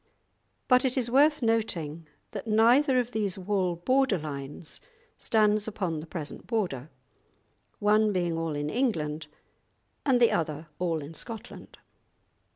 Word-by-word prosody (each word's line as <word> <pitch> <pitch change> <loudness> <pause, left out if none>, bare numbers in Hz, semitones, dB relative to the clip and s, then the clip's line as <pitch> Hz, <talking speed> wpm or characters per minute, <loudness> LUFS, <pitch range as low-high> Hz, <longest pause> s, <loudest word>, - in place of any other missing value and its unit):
But 250 0 +5
it 260 0 0
is 240 -2 0
worth 295 +2 +4
noting 170 -9 -1 0.2
that 210 +1 -6
neither 245 +5 +4
of 245 0 -2
these 205 -5 -1
wall 185 -2 0
border 255 +5 +2
lines 145 0 -6 0.4
stands 215 -1 +2
upon 185 -7 -2
the 155 - -8
present 155 -3 -6
border, 175 - -2 0.9
one 210 +1 +3
being 175 -3 0
all 165 -2 -2
in 145 +1 -2
England 160 - -1 0.8
and 260 -3 +3
the 235 - +5
other 155 -1 -1
all 165 -4 -1
in 145 +3 -9
Scotland. 225 +7 -8
205 Hz, 135 wpm, -28 LUFS, 160-230 Hz, 0.9 s, But